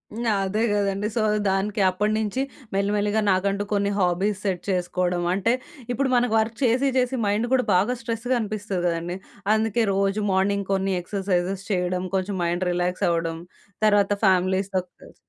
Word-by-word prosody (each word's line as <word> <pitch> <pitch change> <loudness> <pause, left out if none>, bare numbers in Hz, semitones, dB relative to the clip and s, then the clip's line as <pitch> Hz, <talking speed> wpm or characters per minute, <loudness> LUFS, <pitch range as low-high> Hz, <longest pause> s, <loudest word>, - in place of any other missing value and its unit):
హ్మ్. 235 +1 -3 0.2
అదే 210 +4 0
గదండీ! 200 0 0
సో 230 - +1 0.3
దానికి 200 +2 0
అప్పడినుంచి 215 +5 0 0.3
మెల్లిమెల్లిగా 205 +2 +1
నాకంటూ 195 +2 +1
కొన్ని 200 0 +1
హాబీస్ 190 +3 +1
సెట్ 180 -3 -1
చేసుకోవడం. 180 -1 0
అంటే 200 +5 +2 0.4
ఇప్పుడు 265 +2 0
మనకు 245 -2 +2
వర్క్ 220 +1 -1
చేసి 255 +3 +3
చేసి, 255 +1 +1
మైండు 215 +4 0
కూడా 255 -1 +3
బాగా 205 +8 +2
స్ట్రెస్‌గా 230 +2 -1
అనిపిస్తది 210 -3 -3
గదండీ! 170 +1 -2 0.4
అందుకే 225 +1 +1
రోజు 195 +1 +1
మార్నింగ్ 200 +1 +1
కొన్ని 195 0 0
ఎక్సర్‌సైజెస్ 190 0 -1
చేయడం. 180 -1 0
కొంచెం 190 +1 -1
మైండ్ 175 +2 0
రిలాక్స్ 180 +1 0
అవ్వడం. 165 -1 -1 0.5
తర్వాత 205 -1 +4
ఫ్యామిలీస్‌తో 190 +1 +2 0.2
కలిసి - - -15
200 Hz, 145 wpm, -24 LUFS, 185-215 Hz, 0.5 s, తర్వాత